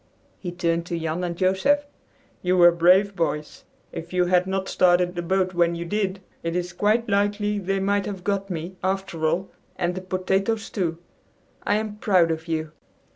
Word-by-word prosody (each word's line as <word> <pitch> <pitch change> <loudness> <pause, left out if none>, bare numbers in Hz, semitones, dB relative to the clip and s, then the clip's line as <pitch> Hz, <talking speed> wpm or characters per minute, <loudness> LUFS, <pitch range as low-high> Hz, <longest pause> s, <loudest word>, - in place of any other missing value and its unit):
He 180 - -5
turned 170 -1 -1
to 170 -2 -2
Jan 165 +2 -2
and 175 -1 -2
Joseph. 190 +12 +2 0.6
"You 180 0 +1
were 175 -1 +8
brave 185 +4 +4
boys! 150 -3 -3 0.3
If 170 +1 -7
you 180 -1 +3
had 180 +1 +3
not 190 0 -2
started 180 0 +3
the 175 - -3
boat 185 +1 0
when 170 -1 +2
you 170 0 -4
did, 195 0 -2 0.2
it 165 0 -3
is 180 0 -2
quite 215 +5 +1
likely 205 0 +1
they 195 0 -1
might 200 +1 0
have 195 -3 -6
got 200 0 -1
me, 175 +1 -5
after 190 -4 -1
all, 175 +5 -1 0.2
and 175 -1 -1
the 185 - -5
potatoes 190 +4 -1
too. 170 -5 -1 0.7
I - - +2
am 215 -1 -3
proud 185 -6 +3
of 160 +1 -4
you." 160 -1 -2
185 Hz, 180 wpm, -24 LUFS, 170-195 Hz, 0.7 s, were